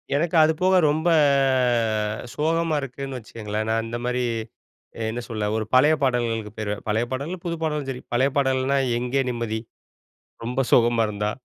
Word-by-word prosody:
எனக்கு 165 Hz, +4 st, 0 dB
அது 160 Hz, +1 st, +4 dB
போக 185 Hz, +1 st, +4 dB
ரொம்ப 160 Hz, +3 st, +1 dB, 1.3 s
சோகமா 165 Hz, +1 st, +1 dB
இருக்குன்னு 135 Hz, 0 st, -6 dB
வச்சுக்கோங்களேன். 110 Hz, -2 st, -5 dB
நான் 115 Hz, 0 st, 0 dB
இந்த 115 Hz, +1 st, -4 dB
மாரி 125 Hz, 0 st, 0 dB, 0.9 s
என்ன 120 Hz, +2 st, -4 dB
சொல்ல 110 Hz, -2 st, -2 dB
ஒரு 110 Hz, -1 st, -1 dB
பழைய 150 Hz, +5 st, +6 dB
பாடல்களுக்கு 115 Hz, -4 st, 0 dB
போயிருவேன். 105 Hz, -1 st, -4 dB
பழைய 110 Hz, +2 st, +1 dB
பாடல், 140 Hz, +6 st, -3 dB
புது 170 Hz, -1 st, -1 dB
பாடலும் 150 Hz, -3 st, -2 dB
சரி 125 Hz, -1 st, -5 dB
பழைய 130 Hz, +3 st, +3 dB
பாடல்னா 135 Hz, 0 st, +2 dB, 0.2 s
"எங்கே 125 Hz, +3 st, 0 dB
நிம்மதி" 115 Hz, -2 st, -3 dB, 0.9 s
ரொம்ப 125 Hz, +2 st, -1 dB
சோகமா 120 Hz, -1 st, +4 dB
இருந்தா 105 Hz, 0 st, -2 dB
125 Hz, 145 wpm, -24 LUFS, 115-140 Hz, 1.3 s, பழைய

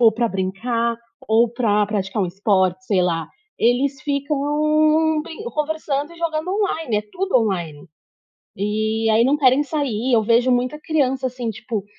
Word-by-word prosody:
ou 230 Hz, -2 st, +7 dB
pra 230 Hz, +1 st, -1 dB
brincar, 230 Hz, +5 st, -1 dB, 0.3 s
ou 225 Hz, +2 st, +4 dB
pra 215 Hz, -4 st, +1 dB
praticar 200 Hz, 0 st, -2 dB
um 185 Hz, -, +1 dB
esporte, 185 Hz, -1 st, 0 dB
sei 195 Hz, -2 st, +1 dB
lá. 165 Hz, -2 st, -1 dB, 0.3 s
Eles 265 Hz, +4 st, +1 dB
ficam 305 Hz, +2 st, +1 dB
brin 340 Hz, +6 st, -9 dB
conversando 300 Hz, -4 st, -2 dB
e 340 Hz, -, -14 dB
jogando 330 Hz, 0 st, -2 dB
online, 350 Hz, -, -1 dB
é 210 Hz, -, 0 dB
tudo 385 Hz, -6 st, 0 dB
online. 175 Hz, -9 st, -2 dB, 0.7 s
E 215 Hz, +2 st, -1 dB
aí 220 Hz, +1 st, +4 dB
não 280 Hz, +3 st, +3 dB
querem 270 Hz, 0 st, +4 dB
sair, 265 Hz, -5 st, -2 dB
eu 220 Hz, -, +4 dB
vejo 235 Hz, +3 st, +3 dB
muita 250 Hz, +5 st, 0 dB
criança, 270 Hz, -5 st, 0 dB
assim, 245 Hz, -2 st, -5 dB
tipo, 220 Hz, -1 st, -5 dB
245 Hz, 155 wpm, -21 LUFS, 210-295 Hz, 0.7 s, ou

